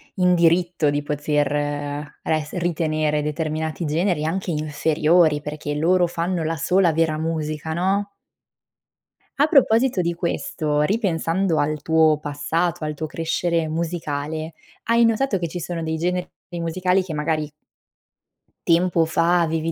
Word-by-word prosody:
in 180 Hz, -1 st, +3 dB
diritto 170 Hz, -2 st, +2 dB
di 145 Hz, 0 st, 0 dB
poter 145 Hz, 0 st, -2 dB
res 155 Hz, -1 st, -1 dB
ritenere 155 Hz, -3 st, 0 dB
determinati 155 Hz, +2 st, -3 dB
generi 160 Hz, +1 st, 0 dB
anche 185 Hz, +3 st, -2 dB
inferiori, 155 Hz, +1 st, +2 dB
perché 150 Hz, 0 st, -5 dB
loro 175 Hz, +4 st, +3 dB
fanno 170 Hz, 0 st, -2 dB
la 165 Hz, +1 st, -1 dB
sola 180 Hz, +3 st, +3 dB
vera 160 Hz, -1 st, +1 dB
musica, 160 Hz, -1 st, -3 dB
no? 195 Hz, +4 st, 0 dB, 1.3 s
A 290 Hz, -, +4 dB
proposito 255 Hz, -, +3 dB
di 170 Hz, 0 st, -1 dB
questo, 165 Hz, -, -1 dB
ripensando 175 Hz, -2 st, 0 dB
al 150 Hz, 0 st, -1 dB
tuo 160 Hz, -1 st, +3 dB
passato, 155 Hz, +4 st, -2 dB
al 150 Hz, 0 st, -2 dB
tuo 155 Hz, +2 st, -5 dB
crescere 165 Hz, +1 st, -1 dB
musicale, 160 Hz, -1 st, -3 dB, 0.3 s
hai 230 Hz, 0 st, +3 dB
notato 230 Hz, -1 st, +1 dB
che 170 Hz, -, -2 dB
ci 175 Hz, +2 st, -6 dB
sono 170 Hz, 0 st, -4 dB
dei 160 Hz, 0 st, -2 dB
generi 180 Hz, +2 st, -1 dB, 0.3 s
musicali 180 Hz, +3 st, +1 dB
che 175 Hz, -3 st, -6 dB
magari 155 Hz, 0 st, -1 dB, 1.2 s
tempo 170 Hz, -1 st, +3 dB
fa 170 Hz, +2 st, +2 dB
avevi 165 Hz, 0 st, -1 dB
165 Hz, 130 wpm, -22 LUFS, 150-175 Hz, 1.3 s, A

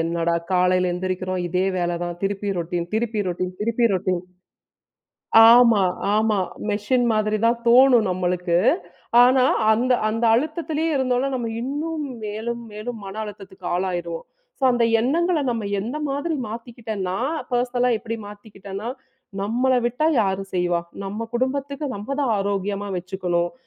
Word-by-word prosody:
"என்னடா! 170 Hz, +1 st, 0 dB, 0.2 s
காலைல 180 Hz, 0 st, +3 dB
எழுந்திரிக்கிறோம். 185 Hz, 0 st, -2 dB
இதே 180 Hz, +2 st, 0 dB
வேலை 175 Hz, -1 st, -1 dB
தான். 175 Hz, 0 st, -4 dB
திருப்பி 200 Hz, +1 st, -2 dB
ரொட்டீன் 170 Hz, 0 st, -2 dB
திருப்பி 220 Hz, -1 st, 0 dB
ரொட்டீன் 180 Hz, +1 st, -3 dB
திருப்பி 230 Hz, +2 st, +2 dB
ரொட்டீன்" 185 Hz, -1 st, 0 dB, 1.3 s
ஆமா, 235 Hz, -4 st, +6 dB, 0.3 s
ஆமா. 215 Hz, -1 st, +2 dB, 0.3 s
மெஷின் 230 Hz, +5 st, +1 dB
மாதிரி 215 Hz, 0 st, +1 dB
தான் 235 Hz, +1 st, +2 dB
தோணும் 245 Hz, -3 st, +6 dB
நம்மளுக்கு. 180 Hz, -1 st, 0 dB, 0.7 s
ஆனா, 255 Hz, +1 st, +4 dB, 0.3 s
அந்த 245 Hz, +4 st, +2 dB, 0.2 s
அந்த 225 Hz, +2 st, -1 dB
அழுத்தத்திலேயே 315 Hz, +3 st, -1 dB
இருந்தோம்னா, 260 Hz, 0 st, +1 dB
நம்ம 235 Hz, -2 st, -3 dB
இன்னும் 300 Hz, +4 st, -3 dB, 0.2 s
மேலும் 225 Hz, +3 st, -4 dB
மேலும் 220 Hz, +3 st, -6 dB
மன 195 Hz, 0 st, -7 dB
அழுத்தத்துக்கு 195 Hz, -3 st, -10 dB
ஆளாகிருவோம். 175 Hz, -2 st, -3 dB, 0.3 s
ஸோ, -, -, -21 dB
அந்த 240 Hz, -1 st, +2 dB, 0.2 s
எண்ணங்கள, 335 Hz, +6 st, +1 dB
நம்ம 230 Hz, -3 st, -2 dB, 0.2 s
எந்த 240 Hz, +8 st, -4 dB
மாதிரி 285 Hz, +4 st, -2 dB
மாத்திக்கிட்டேன்னா, 220 Hz, -5 st, -5 dB, 0.4 s
பெர்சனலா 245 Hz, 0 st, +1 dB
எப்பிடி 230 Hz, +1 st, -5 dB
மாத்திக்கிட்டேன்னா, 205 Hz, 0 st, -8 dB, 0.5 s
"நம்மள 245 Hz, +6 st, +1 dB
விட்டா 250 Hz, +6 st, 0 dB, 0.2 s
யாரும் 195 Hz, -1 st, -2 dB
செய்வா? 175 Hz, -1 st, +1 dB, 0.2 s
நம்ம 210 Hz, +4 st, -4 dB
குடும்பத்துக்கு? 275 Hz, +3 st, -2 dB
நம்ம 205 Hz, +1 st, -8 dB
தான் 235 Hz, -5 st, +1 dB
ஆரோக்கியமா 200 Hz, 0 st, -2 dB
வச்சுக்கணும்." 180 Hz, -1 st, -2 dB
215 Hz, 130 wpm, -23 LUFS, 185-245 Hz, 1.3 s, ஆமா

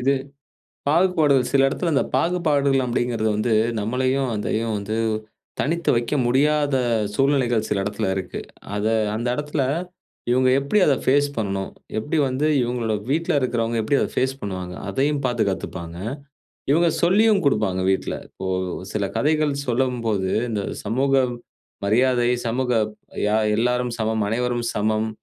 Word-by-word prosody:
இது 135 Hz, +3 st, +3 dB, 0.8 s
பாகுபாடுகள் 155 Hz, -6 st, +3 dB
சில 135 Hz, -1 st, +4 dB
இடத்தில 170 Hz, +5 st, -1 dB
இந்த -, -, +3 dB
பாகுபாடுகள் 145 Hz, -6 st, +2 dB
அப்படிங்கிறது 120 Hz, -2 st, 0 dB
வந்து, 110 Hz, +2 st, +1 dB, 0.3 s
நம்மளையும், 130 Hz, +4 st, 0 dB
அதையும் 110 Hz, +2 st, -1 dB
வந்து 105 Hz, +2 st, -3 dB, 0.6 s
தனித்து 170 Hz, +3 st, 0 dB
வைக்க 120 Hz, +5 st, 0 dB
முடியாத 145 Hz, +3 st, +2 dB, 0.4 s
சூழ்நிலைகள் 125 Hz, -4 st, +2 dB
சில 100 Hz, -2 st, 0 dB
இடத்தில 105 Hz, 0 st, -2 dB
இருக்கு. 95 Hz, -1 st, -4 dB, 0.4 s
அதை 110 Hz, +2 st, 0 dB, 0.2 s
அந்த 120 Hz, +2 st, -2 dB
எடத்தில, 150 Hz, 0 st, -2 dB, 0.7 s
இவுங்க 130 Hz, +1 st, +3 dB
எப்டி 140 Hz, +10 st, +1 dB
அத 140 Hz, -, +4 dB
ஃபேஸ் 145 Hz, +2 st, +4 dB
பண்ணனும்? 100 Hz, -2 st, -2 dB, 0.3 s
எப்டி 150 Hz, +8 st, -2 dB
வந்து 130 Hz, +4 st, 0 dB, 0.2 s
இவங்களுடைய 115 Hz, -3 st, -1 dB
வீட்ல 165 Hz, +3 st, +1 dB
இருக்கிறவங்க, 115 Hz, -2 st, 0 dB
எப்டி 140 Hz, +6 st, +2 dB
அத -, -, +1 dB
ஃபேஸ் 130 Hz, +1 st, +1 dB
பண்ணுவாங்க. 90 Hz, -3 st, -5 dB
அதையும் 140 Hz, +6 st, 0 dB
பாத்து 120 Hz, -3 st, +1 dB
கத்துப்பாங்க. 85 Hz, -2 st, -5 dB, 0.7 s
இவுங்க 170 Hz, +4 st, +4 dB
சொல்லியும் 200 Hz, +3 st, +4 dB
குடுப்பாங்க 105 Hz, -9 st, +1 dB
வீட்ல. 95 Hz, -, -1 dB
இப்போ 95 Hz, -, -8 dB, 0.5 s
சில 105 Hz, -2 st, -1 dB
கதைகள் 150 Hz, +4 st, +2 dB
சொல்லம்போது 115 Hz, -6 st, 0 dB, 0.2 s
இந்த 105 Hz, -3 st, -1 dB, 0.2 s
சமூக 130 Hz, +6 st, 0 dB, 0.7 s
மரியாதை, 120 Hz, +3 st, +3 dB, 0.2 s
சமூக 125 Hz, +2 st, 0 dB, 0.5 s
யா 105 Hz, +1 st, +2 dB, 0.2 s
எல்லாரும் 125 Hz, +1 st, 0 dB
சமம், 110 Hz, 0 st, 0 dB
அனைவரும் 120 Hz, +1 st, -1 dB
சமம், 110 Hz, +1 st, 0 dB
125 Hz, 130 wpm, -22 LUFS, 110-140 Hz, 0.8 s, சில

